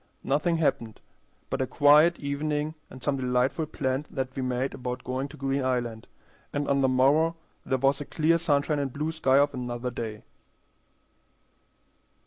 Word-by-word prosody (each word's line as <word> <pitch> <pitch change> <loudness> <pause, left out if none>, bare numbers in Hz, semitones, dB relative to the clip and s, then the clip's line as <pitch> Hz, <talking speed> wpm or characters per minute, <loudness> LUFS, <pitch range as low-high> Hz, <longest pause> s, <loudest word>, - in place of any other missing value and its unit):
Nothing 150 +5 +1
happened 115 -8 -1 0.5
but - - -1
a 130 - 0
quiet 150 +5 +5
evening 150 +2 -2 0.2
and 130 -1 -12
some 140 0 0
delightful 125 +4 0
plans 135 +1 -2
that 130 -1 -4
we 135 - -2
made 130 +1 -1
about 125 0 -5
going 130 +2 -3
to - - -13
Green 135 0 -1
Island, 120 -3 -2 0.4
and 145 0 -2
on 140 0 +2
the 135 - +4
morrow 140 +6 +3 0.3
there 130 - +1
was 135 +2 +2
the 145 - -5
clear 165 +3 +2
sunshine 150 -2 +1
and 140 -2 -2
blue 150 +4 -2
sky 135 -4 +2
of 145 +1 +3
another 125 -1 -4
day. 110 -3 -6
135 Hz, 160 wpm, -27 LUFS, 130-150 Hz, 0.5 s, quiet